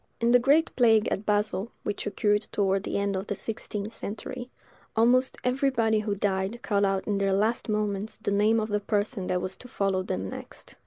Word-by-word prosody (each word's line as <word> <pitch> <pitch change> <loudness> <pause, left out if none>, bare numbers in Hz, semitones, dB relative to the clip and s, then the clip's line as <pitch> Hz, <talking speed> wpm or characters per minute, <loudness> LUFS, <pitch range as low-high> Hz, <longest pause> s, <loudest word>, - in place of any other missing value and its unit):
In 235 0 +2
the 245 - +7
great 285 +6 +3
plague 225 -3 +4
at 200 - -3
Basle, 210 0 0
which 205 0 -3
occurred 205 +1 +1
toward 195 -1 +1
the - - -3
end 200 0 0
of 190 +2 -3
the 205 - -2
sixteenth 215 0 -5
century, 225 +4 -6 0.5
almost 250 +3 +3
everybody 250 -4 +2
who 210 -1 -1
died 195 +2 -1
called 200 -1 +2
out 195 -1 0
in 205 -2 0
their 195 -1 +2
last 220 +4 +1
moments 210 0 -1
the 220 - -2
name 210 +3 +3
of 215 0 -2
the 210 0 +1
person 205 -1 -1
that 180 -1 0
was 185 0 -2
to 250 - -11
follow 195 -5 0
them 95 - -3
next. - - -10
210 Hz, 200 wpm, -27 LUFS, 200-225 Hz, 0.5 s, the